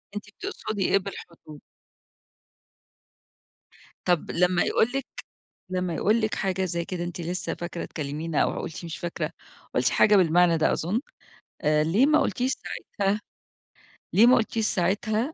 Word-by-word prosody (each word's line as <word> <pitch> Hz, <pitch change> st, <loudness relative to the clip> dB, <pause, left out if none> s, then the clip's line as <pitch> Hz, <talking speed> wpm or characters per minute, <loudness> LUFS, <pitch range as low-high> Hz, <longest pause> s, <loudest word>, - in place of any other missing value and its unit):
أنتِ 205 Hz, -, -5 dB
بتقصدي 205 Hz, -1 st, -4 dB
إيه -, -, +5 dB
بالحدود؟ 170 Hz, -6 st, -9 dB, 2.5 s
طب 175 Hz, -3 st, +1 dB
لما 180 Hz, 0 st, +3 dB
يقول 230 Hz, +3 st, +2 dB
لِك 275 Hz, -, -1 dB, 0.7 s
لما 180 Hz, -2 st, -1 dB
يقول 220 Hz, +7 st, +2 dB
لِك 215 Hz, 0 st, 0 dB
حاجة 190 Hz, -1 st, -1 dB
زي 170 Hz, -1 st, -2 dB
كده 175 Hz, -1 st, -4 dB
أنتِ 175 Hz, 0 st, -5 dB
لسه 175 Hz, +2 st, -3 dB
فاكرة 170 Hz, 0 st, -5 dB
تكلمينا 155 Hz, +1 st, -2 dB
أو -, -, -1 dB
قُلتِ 165 Hz, +1 st, -6 dB
مش 165 Hz, -1 st, -6 dB
فاكرة، 175 Hz, -1 st, -3 dB, 0.4 s
قُلتِ -, -, +3 dB
حاجة 210 Hz, -1 st, +5 dB
بالمعنى 175 Hz, -1 st, +4 dB
ده 160 Hz, -, +3 dB
أظن، 195 Hz, +9 st, -1 dB, 0.6 s
آآ 150 Hz, 0 st, +3 dB
ليه 200 Hz, -, +3 dB
ما 310 Hz, +1 st, +4 dB
قُلتيش 255 Hz, 0 st, 0 dB
ساعتها 205 Hz, -5 st, -2 dB, 0.9 s
ليه 220 Hz, +4 st, +7 dB
ما 255 Hz, -, +7 dB
قلتيش 220 Hz, -1 st, 0 dB
ساعتها، 215 Hz, -, 0 dB
185 Hz, 140 wpm, -26 LUFS, 170-215 Hz, 2.5 s, ليه